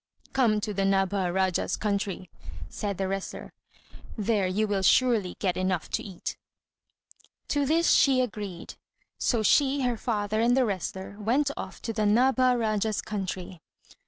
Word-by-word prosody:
"Come 230 Hz, -5 st, +3 dB
to 210 Hz, 0 st, -3 dB
the 195 Hz, -, -1 dB
Nabha 195 Hz, -1 st, +1 dB
Rájá's 190 Hz, -1 st, 0 dB
country," 200 Hz, -3 st, -2 dB, 0.4 s
said 200 Hz, -, -4 dB
the 190 Hz, 0 st, -1 dB
wrestler. 195 Hz, 0 st, -5 dB, 0.6 s
"There 210 Hz, -2 st, +1 dB
you 210 Hz, +4 st, 0 dB
will 200 Hz, -2 st, 0 dB
surely 220 Hz, -2 st, +3 dB
get 185 Hz, -3 st, 0 dB
enough 185 Hz, -2 st, -1 dB
to -, -, 0 dB
eat." 190 Hz, -4 st, -6 dB, 1.1 s
To 285 Hz, -1 st, +1 dB
this 330 Hz, +3 st, +3 dB
she 270 Hz, -2 st, +5 dB
agreed; 205 Hz, -7 st, -4 dB, 0.5 s
so 230 Hz, -3 st, +1 dB
she, 275 Hz, +5 st, +3 dB
her 245 Hz, -2 st, 0 dB
father, 215 Hz, -1 st, -1 dB
and 240 Hz, +2 st, +3 dB
the 260 Hz, -, +4 dB
wrestler 190 Hz, -1 st, -4 dB
went 265 Hz, +7 st, +1 dB
off -, -, -8 dB
to 225 Hz, -, -3 dB
the 215 Hz, -1 st, 0 dB
Nabha 255 Hz, +3 st, +4 dB
Rájá's 215 Hz, -2 st, 0 dB
country. 185 Hz, -4 st, -5 dB
210 Hz, 150 wpm, -27 LUFS, 190-240 Hz, 1.1 s, she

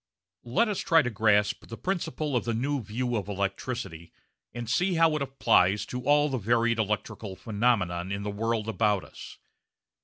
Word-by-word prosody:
Let 230 Hz, -, +3 dB
us 210 Hz, -3 st, -2 dB
try 165 Hz, -3 st, +4 dB
to 125 Hz, -, -2 dB
grasp 105 Hz, -1 st, +2 dB
the 115 Hz, -, -8 dB
principle 160 Hz, -6 st, -2 dB
of 120 Hz, -, +1 dB
the 115 Hz, -1 st, -2 dB
new 140 Hz, +4 st, -1 dB
view 120 Hz, +3 st, -3 dB
of 105 Hz, -2 st, -3 dB
electricity 100 Hz, -3 st, -4 dB, 0.4 s
and 120 Hz, -1 st, -6 dB
see 180 Hz, -, +1 dB
how 165 Hz, -1 st, +4 dB
it 150 Hz, -, -2 dB
applies 105 Hz, -7 st, +2 dB
to 125 Hz, -, -5 dB
all 145 Hz, 0 st, +4 dB
the 135 Hz, -3 st, -2 dB
varied 115 Hz, +2 st, +1 dB
electrical 105 Hz, -1 st, -3 dB
phenomena 105 Hz, -5 st, 0 dB
in 100 Hz, 0 st, -3 dB
the 105 Hz, -, -3 dB
world 115 Hz, +1 st, -1 dB
about 105 Hz, -3 st, +1 dB
us. -, -, -11 dB
115 Hz, 175 wpm, -27 LUFS, 105-135 Hz, 0.4 s, try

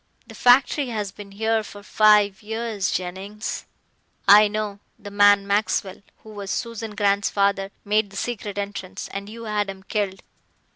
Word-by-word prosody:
The -, -, -13 dB
factory 260 Hz, +3 st, +4 dB
has 210 Hz, -4 st, -3 dB
been 200 Hz, 0 st, -11 dB
here 220 Hz, +2 st, +1 dB
for 205 Hz, -1 st, -11 dB
five 210 Hz, -2 st, +4 dB
years, 220 Hz, -2 st, -2 dB
Jennings 190 Hz, +4 st, -5 dB, 0.3 s
" -, -, -44 dB, 0.3 s
"I 210 Hz, +1 st, +8 dB
know. 205 Hz, -1 st, -4 dB, 0.2 s
The 205 Hz, -2 st, -10 dB
man 205 Hz, 0 st, +5 dB
Maxwell, 200 Hz, -1 st, -1 dB, 0.2 s
who 220 Hz, -, -12 dB
was 200 Hz, -2 st, -7 dB
Susan 230 Hz, -2 st, -4 dB
Grant's 200 Hz, -1 st, +2 dB
father, 200 Hz, -1 st, +1 dB, 0.2 s
made 210 Hz, 0 st, +1 dB
the 195 Hz, -, -10 dB
secret 205 Hz, -3 st, -4 dB
entrance, 200 Hz, -2 st, -5 dB
and 200 Hz, +1 st, -6 dB
you 230 Hz, +1 st, -9 dB
had 210 Hz, -2 st, -1 dB
him 190 Hz, 0 st, -8 dB
killed." 195 Hz, -2 st, -3 dB
205 Hz, 160 wpm, -23 LUFS, 200-215 Hz, 0.3 s, I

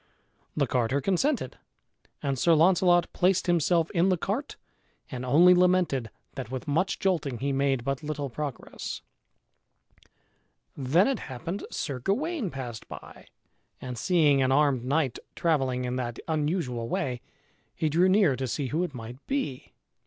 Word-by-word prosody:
The -, -, +3 dB
carter 125 Hz, +2 st, 0 dB
consented, 195 Hz, -, 0 dB, 0.6 s
and 135 Hz, -2 st, -1 dB
Sir 170 Hz, +3 st, +4 dB
Launcelot 175 Hz, +1 st, +4 dB
placed 185 Hz, +1 st, +2 dB
himself 170 Hz, -1 st, +2 dB
in 180 Hz, +1 st, +2 dB
the 185 Hz, -, +2 dB
cart 210 Hz, -, -3 dB, 0.6 s
and 130 Hz, -2 st, -5 dB
only 165 Hz, +8 st, +6 dB
lamented 180 Hz, -9 st, +2 dB, 0.2 s
that 130 Hz, -4 st, -6 dB
with 130 Hz, +3 st, -6 dB
much 165 Hz, +7 st, +1 dB
jolting 165 Hz, -, 0 dB
he 140 Hz, +3 st, -1 dB
made 135 Hz, -2 st, +1 dB
but 135 Hz, +2 st, -2 dB
little 150 Hz, -2 st, -3 dB
progress. 140 Hz, +1 st, -6 dB, 1.7 s
Then 150 Hz, +9 st, +3 dB
it 270 Hz, -, 0 dB
happened 150 Hz, +9 st, -6 dB
Sir 140 Hz, -4 st, -4 dB
Gawain 260 Hz, -, -1 dB
passed 125 Hz, -6 st, -7 dB
by -, -, -11 dB, 0.5 s
and 125 Hz, -1 st, -6 dB
seeing 145 Hz, 0 st, +3 dB
an 130 Hz, 0 st, +2 dB
armed 140 Hz, -3 st, +3 dB
knight 135 Hz, -1 st, 0 dB, 0.2 s
travelling 135 Hz, -6 st, 0 dB
in 125 Hz, +1 st, -2 dB
that 120 Hz, -2 st, -3 dB
unusual 150 Hz, -7 st, -1 dB
way 125 Hz, -2 st, -2 dB, 0.5 s
he 160 Hz, -, 0 dB
drew 170 Hz, +5 st, +3 dB
near 190 Hz, -8 st, +4 dB
to 130 Hz, -, -2 dB
see 130 Hz, +3 st, -2 dB
who 155 Hz, +6 st, 0 dB
it 170 Hz, -7 st, -5 dB
might 120 Hz, +3 st, -9 dB
be. 270 Hz, -, -3 dB
145 Hz, 145 wpm, -27 LUFS, 130-180 Hz, 1.7 s, only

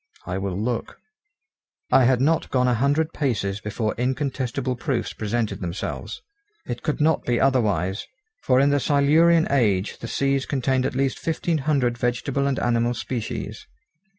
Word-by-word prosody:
I 95 Hz, +1 st, -3 dB
will 95 Hz, -2 st, -3 dB
look. 115 Hz, +3 st, -3 dB, 0.9 s
I 130 Hz, -, +6 dB
had 125 Hz, 0 st, +3 dB
not 160 Hz, +4 st, +2 dB
gone 125 Hz, -1 st, +2 dB
a 125 Hz, -, +3 dB
hundred 145 Hz, +6 st, +1 dB
paces 105 Hz, -8 st, -1 dB
before 105 Hz, +1 st, -2 dB
incontestable 130 Hz, -1 st, -1 dB
proofs 125 Hz, -1 st, -2 dB
presented 110 Hz, -2 st, -2 dB
themselves. 90 Hz, +1 st, -5 dB, 0.4 s
It 120 Hz, -1 st, -5 dB
could 150 Hz, -, -2 dB
not 160 Hz, 0 st, +2 dB
be 120 Hz, -1 st, 0 dB
otherwise, 110 Hz, -7 st, +1 dB, 0.3 s
for 125 Hz, -, +3 dB
in 140 Hz, +1 st, +4 dB
the 145 Hz, -, +3 dB
Silurian 155 Hz, +5 st, +4 dB
age 105 Hz, -8 st, +1 dB
the 115 Hz, -, -6 dB
seas 135 Hz, +2 st, 0 dB
contained 130 Hz, -1 st, +1 dB
at -, -, -5 dB
least 135 Hz, 0 st, 0 dB
fifteen 165 Hz, 0 st, -1 dB
hundred 135 Hz, -4 st, 0 dB
vegetable 125 Hz, +3 st, 0 dB
and 135 Hz, -1 st, 0 dB
animal 120 Hz, 0 st, +1 dB
species. 120 Hz, 0 st, -5 dB
125 Hz, 150 wpm, -23 LUFS, 115-140 Hz, 0.9 s, I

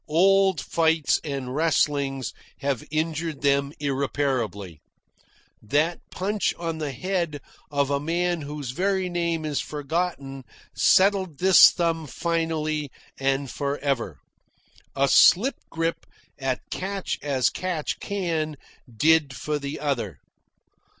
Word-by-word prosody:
Old 190 Hz, +2 st, +4 dB
fights 160 Hz, -2 st, +2 dB
and 135 Hz, -4 st, -4 dB
wrestlings 145 Hz, -4 st, +1 dB, 0.3 s
have 140 Hz, -4 st, -1 dB
injured 155 Hz, -1 st, -2 dB
them 140 Hz, 0 st, +2 dB
irreparably. 130 Hz, -, -2 dB, 0.8 s
That 150 Hz, +10 st, +1 dB
punch 200 Hz, +3 st, -1 dB
on 165 Hz, -2 st, -4 dB
the 150 Hz, -2 st, -3 dB
head 170 Hz, 0 st, -2 dB, 0.3 s
of 140 Hz, -1 st, 0 dB
a 140 Hz, -, +1 dB
man 170 Hz, +3 st, -1 dB
whose 145 Hz, -3 st, -5 dB
very 190 Hz, +4 st, 0 dB
name 170 Hz, -2 st, -1 dB
is 150 Hz, -2 st, -1 dB
forgotten 145 Hz, -3 st, -3 dB, 0.3 s
settled 190 Hz, -5 st, +3 dB
this 185 Hz, +3 st, +8 dB
thumb 165 Hz, -2 st, -1 dB
finally 155 Hz, -2 st, -1 dB, 0.3 s
and 135 Hz, +1 st, 0 dB
for 140 Hz, +2 st, -3 dB
ever. 125 Hz, -, -2 dB, 0.8 s
A 140 Hz, 0 st, +3 dB
slip 210 Hz, -, +5 dB
grip 165 Hz, 0 st, -2 dB, 0.3 s
at 135 Hz, -2 st, -2 dB
catch 195 Hz, 0 st, -3 dB
as 135 Hz, -4 st, +1 dB
catch 180 Hz, -5 st, -3 dB
can 165 Hz, -6 st, -2 dB, 0.3 s
did 150 Hz, +3 st, +3 dB
for 150 Hz, +5 st, -2 dB
the 140 Hz, +2 st, -5 dB
other. 115 Hz, -, -2 dB
150 Hz, 115 wpm, -25 LUFS, 140-170 Hz, 0.8 s, this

